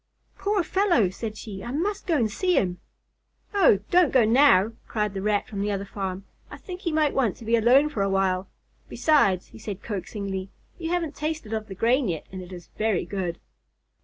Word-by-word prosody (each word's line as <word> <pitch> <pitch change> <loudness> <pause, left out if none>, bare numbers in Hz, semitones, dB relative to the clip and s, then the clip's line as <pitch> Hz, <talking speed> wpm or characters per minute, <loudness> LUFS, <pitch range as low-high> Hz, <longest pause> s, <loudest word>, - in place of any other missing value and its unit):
"Poor 405 -2 0
fellow!" 345 - +2
said 215 +2 -6
she. 200 -4 -8
"I 235 - -6
must 390 +11 -2
go 330 -3 +2
to 235 -5 +2
see 360 - 0
him." 180 -2 0 0.7
"Oh, 350 - +5
don't 355 -3 +5
go 255 -4 +5
now," 225 -4 +5 0.2
cried 210 -2 -1
the 195 - -4
Rat 205 0 0
from 200 -2 -5
the 205 - 0
other 200 0 -2
farm. 195 -1 -5 0.2
"I - - -9
think 365 -1 -9
he 340 - -1
might 310 -2 +2
want 240 -8 +1
to 230 - -11
be 230 +1 +3
alone 250 +6 +5
for 265 -9 -3
a 195 - +1
while. 190 -1 0 0.4
Besides," 200 - +2
he 225 - -14
added 200 -2 -6
coaxingly, 195 -2 -4 0.3
"you 330 -1 -3
haven't 335 -4 -1
tasted 300 -8 -4
of 220 -1 -3
the 195 - -8
grain 240 +5 +2
yet, 165 -4 -3
and 185 0 -6
it 180 0 -11
is 175 -3 -10
very 215 -5 +1
good." 180 -2 -3
220 Hz, 205 wpm, -25 LUFS, 195-300 Hz, 0.7 s, Oh